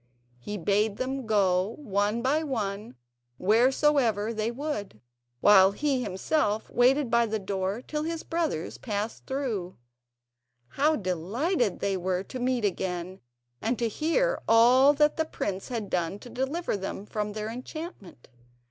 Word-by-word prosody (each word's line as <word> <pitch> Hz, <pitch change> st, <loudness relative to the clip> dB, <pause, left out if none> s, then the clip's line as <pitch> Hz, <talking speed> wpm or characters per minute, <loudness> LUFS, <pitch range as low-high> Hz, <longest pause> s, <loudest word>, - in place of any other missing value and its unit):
He 205 Hz, +12 st, -5 dB
bade 205 Hz, +3 st, +1 dB
them 260 Hz, -1 st, -3 dB
go 195 Hz, -1 st, +2 dB
one 210 Hz, -3 st, -1 dB
by 290 Hz, +5 st, +2 dB
one 215 Hz, -, -3 dB, 0.4 s
wheresoever 230 Hz, 0 st, +3 dB
they 215 Hz, 0 st, -1 dB
would, 235 Hz, -, -4 dB, 0.4 s
while 195 Hz, -1 st, +7 dB
he 275 Hz, +2 st, 0 dB
himself 210 Hz, +2 st, -1 dB
waited 255 Hz, +1 st, +3 dB
by 235 Hz, 0 st, +4 dB
the 220 Hz, 0 st, -1 dB
door 195 Hz, +2 st, -3 dB
till 300 Hz, +2 st, -3 dB
his 325 Hz, +1 st, -3 dB
brothers 325 Hz, -, -2 dB
passed 210 Hz, -1 st, -4 dB
through. 230 Hz, -10 st, -3 dB, 0.9 s
How 300 Hz, -, +2 dB
delighted 210 Hz, -, -1 dB
they 195 Hz, -1 st, 0 dB
were 185 Hz, 0 st, -1 dB
to 255 Hz, +6 st, -7 dB
meet 250 Hz, -2 st, 0 dB
again, 185 Hz, -1 st, -3 dB, 0.4 s
and 230 Hz, +3 st, 0 dB
to 235 Hz, -, 0 dB
hear 335 Hz, -, 0 dB
all 250 Hz, +5 st, +6 dB
that 300 Hz, +1 st, +2 dB
the 320 Hz, -, +2 dB
prince 195 Hz, -10 st, -4 dB
had 230 Hz, -5 st, -4 dB
done 175 Hz, +1 st, -1 dB
to 240 Hz, +3 st, -12 dB
deliver 275 Hz, +3 st, -2 dB
them 195 Hz, 0 st, -5 dB
from 210 Hz, -1 st, -3 dB
their 215 Hz, +1 st, -4 dB
enchantment. 250 Hz, -, -8 dB
225 Hz, 140 wpm, -27 LUFS, 200-270 Hz, 0.9 s, while